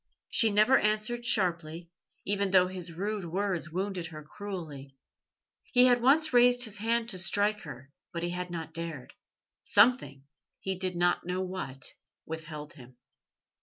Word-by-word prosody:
She 225 - +4
never 215 +6 +4
answered 215 +3 -1
sharply, 170 -4 0 0.3
even 200 0 0
though 185 -1 +5
his 180 -2 -4
rude 200 +4 -3
words 180 -2 -2
wounded 185 0 -3
her 155 -2 -10
cruelly. 150 -7 -8 0.8
He 250 0 +7
had 245 -1 +4
once 285 +4 +3
raised 245 0 +5
his 215 -3 -3
hand 230 +1 0
to 185 -5 -2
strike 205 +3 +2
her, 135 -9 -10 0.2
but 170 0 -5
he 175 - -2
had 180 0 -4
not 165 -2 -6
dared; 165 -5 -6 0.5
something 205 - +3 0.4
he 190 0 -3
did 185 -1 -2
not 175 0 +1
know 180 +1 -1
what 180 -8 -6 0.3
withheld 155 -2 -7
him. 125 -3 -15
185 Hz, 150 wpm, -29 LUFS, 165-215 Hz, 0.8 s, He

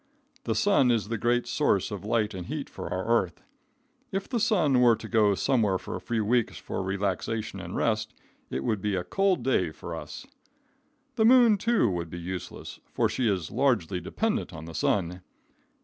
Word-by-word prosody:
The - - 0
sun 200 -11 +3
is 115 -3 +1
the 115 - -1
great 120 +1 +1
source - - +1
of - - -5
light 110 -2 0
and 90 -2 -6
heat - - -5
for - - -7
our 95 +1 -2
earth. 115 -7 0 0.7
If 195 0 -3
the 240 - -1
sun 160 - +3
were 120 -2 +6
to - - -9
go 105 -3 +3
somewhere 105 -5 +2
for - - -7
a 90 - -6
few 110 +3 -1
weeks 120 +1 +1
for - - -4
relaxation 100 +2 -2
and 95 - -7
rest, 110 -1 0 0.3
it 65 +1 -3
would 105 +7 -1
be 105 -1 0
a 90 - -1
cold 185 - +1
day 105 -10 +2
for 80 - -8
us. - - -8 0.9
The 220 - +4
moon, 240 -2 +7
too, 225 - +2
would 85 -4 -2
be 85 - -7
useless, 90 +1 -7
for - - +1
she 125 - 0
is 90 -7 -2
largely 110 -9 +1
dependent 220 - -2
on 80 0 -8
the 80 - -9
sun. 90 +1 0
110 Hz, 190 wpm, -27 LUFS, 95-130 Hz, 0.9 s, moon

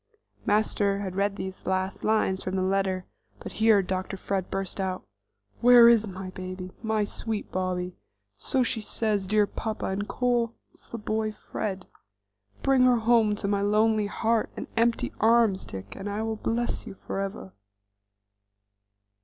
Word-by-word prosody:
'" - - -50
Master 205 -1 +2
had 190 -2 -4
read 200 +1 +1
these 190 -1 -7
last 190 +1 -1
lines 215 -3 +1
from 185 - -3
the 185 - +1
letter, 190 -1 0 0.3
but - - -7
here 220 -3 +5
Dr. 185 +1 -3
Fred 190 -1 -2
burst 195 0 -4
out: 185 -1 -2 0.5
"Where 240 -1 +8
is 230 -2 +5
my 185 -1 -7
baby; 185 0 -7
my 220 -1 +1
sweet 215 +1 -4
Bobby? 180 -1 -2 0.4
So 260 - 0
she 230 -2 -1
says 210 -2 -1
'dear 210 +1 +3
papa,' 220 +1 -4
and 205 +2 -2
calls 240 -2 0 0.4
the 235 - -4
boy 215 0 -1
Fred! 195 -3 -5 0.8
Bring 270 -1 +4
her 250 -1 +5
home 225 -2 +3
to 205 - -3
my 200 0 +1
lonely 215 +1 +2
heart 225 +2 0
and - - -4
empty 230 +1 +1
arms, 225 -3 +3
Dick, 95 +1 -8
and 205 - -5
I'll 220 +2 -2
bless 235 +2 -2
you - - -8
forever." 195 - -5
205 Hz, 155 wpm, -27 LUFS, 190-225 Hz, 0.8 s, Where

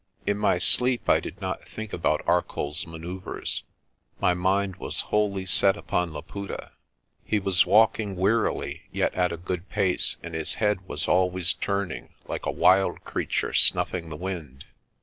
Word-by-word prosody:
In 100 - +1
my 105 -3 +1
sleep 125 +7 +5
I - - +4
did 100 - -8
not 95 -1 -5
think 110 -1 -8
about 75 -3 0
ArcolPs 85 -3 -1
manoeuvres. 85 +3 -5 0.6
My 90 - +3
mind 95 +1 0
was - - -4
wholly 100 -3 +1
set 95 +1 +6
upon 90 -2 -2
Laputa. 90 +6 -7 0.5
He 110 - 0
was 95 -2 +2
walking 110 -2 +3
wearily 105 +5 0
yet - - 0
at 90 -1 0
a 85 - -4
good 90 +2 -5
pace, 95 -4 +1
and 85 -1 -8
his 80 -1 -1
head 105 -4 -1
was - - -4
always 90 -1 +2
turning, 100 -3 -4
like - - -5
a - - +1
wild 95 +1 +3
creature - - -2
snuffing 85 -2 +3
the 75 - -7
wind. 85 -8 -6
95 Hz, 155 wpm, -25 LUFS, 85-100 Hz, 0.6 s, set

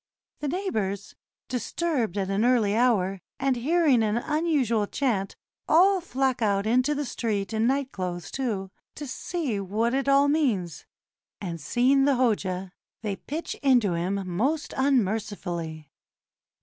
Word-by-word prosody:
The 295 - -3
neighbors, 220 - -2 0.3
disturbed 250 - -1
at 195 -1 -1
an 200 +3 +1
early 235 -5 +3
hour, 200 -6 +2 0.2
and 265 0 +1
hearing 285 0 +3
an 215 0 +1
unusual 270 -7 +1
chant, 215 -8 -1 0.3
all 375 +4 +5
flock 265 -6 -1
out 200 -2 +1
into 255 +6 +2
the 290 0 -2
street 215 -4 -2
in 220 +1 +2
night 270 +1 0
clothes, 175 -2 -5
too, 210 -8 -3 0.2
to 295 - -6
see 280 - -3
what 215 +5 -1
it 275 +1 0
all 275 +1 +5
means, 245 - 0 0.5
and 170 -5 -5
seeing 260 - +3
the 280 -1 +3
Hoja, 195 -7 0 0.3
they 205 -2 -2
pitch 310 - -5
into 245 -9 +3
him 175 +4 -1
most 255 - -1
555 - - -9
TURKEY 265 - +3
unmercifully. 175 - -3
235 Hz, 145 wpm, -26 LUFS, 195-275 Hz, 0.5 s, all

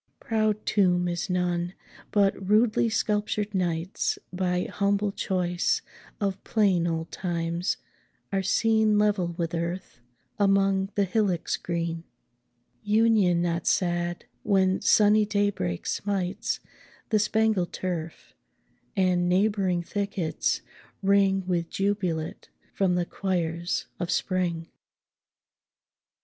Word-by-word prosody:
Proud 215 -1 0
tomb 180 -3 +2
is 175 +2 -2
none; 180 0 -1 0.3
but 200 -2 +3 0.2
rudely 220 +2 +4
sculptured 210 -1 -1
knights, 175 -1 -1 0.2
By 180 -1 0
humble 200 0 0
choice 180 -2 0 0.4
of 195 -2 -2
plain 190 -6 +2
old 165 0 -3
times, 170 0 -2 0.6
are 195 - +2
seen 220 +2 +3
10 - - +3
Level 205 -4 +2
with 165 -1 -2
earth, 170 -3 -4 0.4
among 195 -1 +3
the 205 - +3
hillocks 195 -3 0
green: 170 -1 -3 0.8
Union 210 -5 +3
not 170 0 -1
sad, 175 -1 0 0.2
when 190 -2 +2
sunny 210 0 +5
daybreak 205 - -1
smites 195 -2 -2 0.5
The 215 - +3
spangled 215 -4 +1
turf, 170 -3 -5 0.6
and 180 -2 +2
neighbouring 190 -2 +2
thickets 200 -3 -2 0.4
ring 195 -1 +3
With 175 -2 -1
jubilate 190 -5 -2 0.2
from 190 -2 +1
the 175 -1 +1
choirs 175 -2 -2
of 175 - -3
spring! 175 -4 -1
185 Hz, 105 wpm, -26 LUFS, 175-205 Hz, 0.8 s, sunny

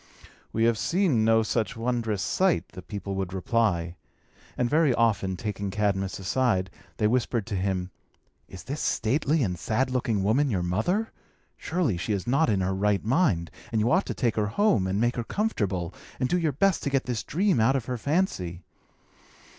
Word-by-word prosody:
"We 110 - 0
have 115 -2 +3
seen 170 - +2
no 110 0 +4
such 115 +1 -1
wondrous 115 -3 -1
sight," 185 -2 +1
the 90 - -10
people 100 +1 -6
would 95 -1 -3
reply; 90 -4 0 0.6
and 125 - +1
very 150 -1 +3
often, 100 -5 +1
taking 100 -1 -3
Cadmus 100 -2 -1
aside, 95 -1 0 0.3
they 105 - +1
whispered 115 -1 +1
to 110 - -4
him, 95 -1 -1 0.6
"Is 95 - -10
this 140 +3 -4
stately 140 +6 +1
and 90 -5 -2
sad 125 +8 0
looking 115 -6 0
woman 130 +8 +2
your 95 -6 0
mother? 145 - 0 0.4
Surely 160 - -1
she 105 +5 -2
is 100 -3 -2
not 135 +4 +2
in 100 -3 +1
her 95 +1 0
right 100 +1 +1
mind; 110 - +1 0.2
and 110 - +1
you 110 +3 +2
ought 185 +4 +2
to - - -3
take 120 -4 0
her 105 -1 +1
home, 110 - +2
and 95 +2 -1
make 120 +2 +1
her 120 - -1
comfortable, 100 - -2 0.3
and 130 - +1
do 180 +6 +1
your 160 -3 +1
best 190 +6 +2
to - - -1
get 135 -1 +1
this 120 -3 -2
dream 185 - +1
out 115 +5 +3
of 130 -4 -1
her 125 -1 -3
fancy." 105 - -1
110 Hz, 185 wpm, -26 LUFS, 95-135 Hz, 0.6 s, no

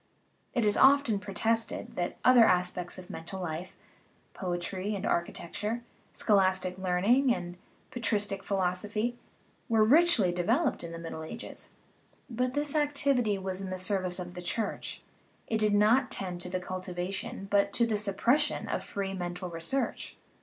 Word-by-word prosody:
It 240 -3 +2
is 210 0 +3
often 270 -6 +5
protested 225 +3 -1
that 175 -1 -2
other 250 -2 +8
aspects 180 -3 +1
of 185 -1 -9
mental 170 +4 -7
life 175 0 -5 0.6
poetry 185 +3 -3
and 200 +1 -4
architecture, 210 +7 -2 0.3
scholastic 190 -3 +2
learning 200 +9 +3
and 175 0 -6 0.4
patristic 210 -5 0
philos 185 -2 0
ophy 215 +3 -1 0.6
were 225 -1 +4
richly 265 - +5
developed 230 - +1
in 170 - -6
the 165 - -6
Middle 165 -1 -6
Ages. 230 +9 -8 0.6
But 250 +2 -1
this 290 -1 0
activity 280 -7 +1
was 190 0 -4
in 190 - -5
the 185 - -3
service 185 -1 -1
of 180 -1 -6
the 180 - -7
Church; 205 +4 -3 0.4
it 220 - -1
did 210 -1 +3
not 230 +6 +4
tend 180 -2 -2
to 180 - -1
the 185 0 -2
cultivation, 185 +4 -5
but 200 0 +3
to 235 - +3
the 225 -2 0
suppression, 215 +7 +1
of - - -2
free 195 -1 -4
mental 180 0 -4
research. 165 +12 -2
195 Hz, 150 wpm, -30 LUFS, 180-230 Hz, 0.6 s, other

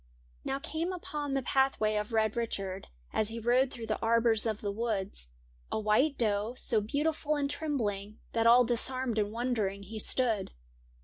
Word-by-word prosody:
Now 270 - -1
came 320 +5 -3
upon 295 -6 -4
the 270 - 0
pathway 265 -5 +2
of 210 +2 -2
Red 220 -1 +1
Richard, 195 -5 -3 0.3
As 215 - +2
he 225 - -5
rode 245 +3 +3
through 235 -3 -7
the 215 -1 -2
arbours 230 -1 +3
of 215 -1 -2
the 205 - -3
wood, 210 -3 -2 0.6
A - - 0
white 220 +8 +2
doe, 215 +1 0
so 225 -4 +2
beautiful 300 +6 -1
and 285 -1 0
trembling, 225 -9 -3 0.2
That 230 0 +2
all 245 +1 +7
disarmed 245 0 0
and 205 0 0
wondering 220 -4 -1
he 215 +3 -7
stood. 225 -3 +1
230 Hz, 170 wpm, -30 LUFS, 215-265 Hz, 0.6 s, all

